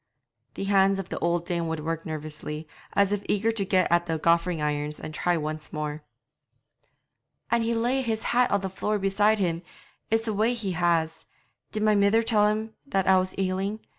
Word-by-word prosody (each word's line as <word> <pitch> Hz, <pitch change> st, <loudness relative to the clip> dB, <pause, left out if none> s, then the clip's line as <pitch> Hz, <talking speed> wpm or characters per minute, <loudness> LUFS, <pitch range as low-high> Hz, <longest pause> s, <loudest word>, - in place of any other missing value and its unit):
The -, -, -4 dB
hands 195 Hz, 0 st, +3 dB
of 195 Hz, -2 st, -5 dB
the -, -, -4 dB
old 170 Hz, 0 st, 0 dB
dame 170 Hz, -1 st, -1 dB
would 160 Hz, -1 st, -3 dB
work 165 Hz, +1 st, -3 dB
nervously, 155 Hz, 0 st, -6 dB, 0.3 s
as 200 Hz, -1 st, +3 dB
if 205 Hz, -1 st, -1 dB
eager 215 Hz, +3 st, +2 dB
to 225 Hz, -3 st, -1 dB
get 185 Hz, -2 st, +2 dB
at 175 Hz, 0 st, +3 dB
the 165 Hz, -1 st, 0 dB
goffering 170 Hz, +1 st, +2 dB
irons 150 Hz, 0 st, -2 dB
and 155 Hz, -, -7 dB
try 175 Hz, +3 st, +1 dB
once 155 Hz, 0 st, -5 dB
more. 150 Hz, 0 st, -4 dB, 1.5 s
'An' 235 Hz, -, +3 dB
he'd 230 Hz, +1 st, 0 dB
lay 245 Hz, +4 st, +1 dB
his 225 Hz, -3 st, -2 dB
hat 245 Hz, +1 st, +2 dB
on 200 Hz, -, +1 dB
the 195 Hz, -, -2 dB
floor 210 Hz, +3 st, -1 dB
beside 205 Hz, +2 st, +2 dB
him; 170 Hz, -4 st, 0 dB, 0.5 s
it's 225 Hz, +1 st, +1 dB
a 220 Hz, -, 0 dB
way 220 Hz, +4 st, +2 dB
he 210 Hz, -5 st, -3 dB
has. 165 Hz, -2 st, 0 dB, 0.4 s
Did 215 Hz, -1 st, -2 dB
my 215 Hz, 0 st, +4 dB
mither 205 Hz, +3 st, +4 dB
tell 215 Hz, -2 st, +4 dB
him 215 Hz, +1 st, -2 dB
that 195 Hz, -7 st, 0 dB
I 190 Hz, -1 st, +5 dB
was 185 Hz, 0 st, -3 dB
ailing? 195 Hz, +2 st, -1 dB
190 Hz, 195 wpm, -26 LUFS, 165-215 Hz, 1.5 s, I